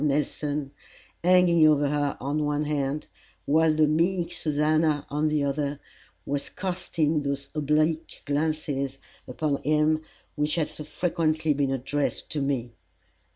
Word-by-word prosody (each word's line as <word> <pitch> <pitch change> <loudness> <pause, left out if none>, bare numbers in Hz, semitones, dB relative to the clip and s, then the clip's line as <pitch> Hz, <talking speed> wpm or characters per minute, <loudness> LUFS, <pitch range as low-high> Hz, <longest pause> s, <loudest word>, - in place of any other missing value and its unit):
Nelson, 145 0 -1 0.5
hanging 175 -3 +6
over 145 -1 +4
her 145 -1 0
on 145 +3 -1
one 150 0 0
hand, 145 0 -1 0.4
while 160 +2 +4
the 155 0 +4
meek 170 +3 +1
Susannah 155 -1 +1
on 150 +2 +1
the 150 -1 +1
other, 140 0 -1 0.5
was 140 0 -3
casting 175 -5 -1
those 140 -1 -3
oblique 155 +1 0
glances 145 -2 -1 0.3
upon 140 +2 -1
him 155 +1 +2 0.3
which 150 0 0
had 165 -3 0
so 150 - -8
frequently 155 -2 0
been 140 -1 0
addressed 135 +2 -2
to 150 - -1
me. 130 -4 -1
150 Hz, 130 wpm, -26 LUFS, 145-155 Hz, 0.5 s, hanging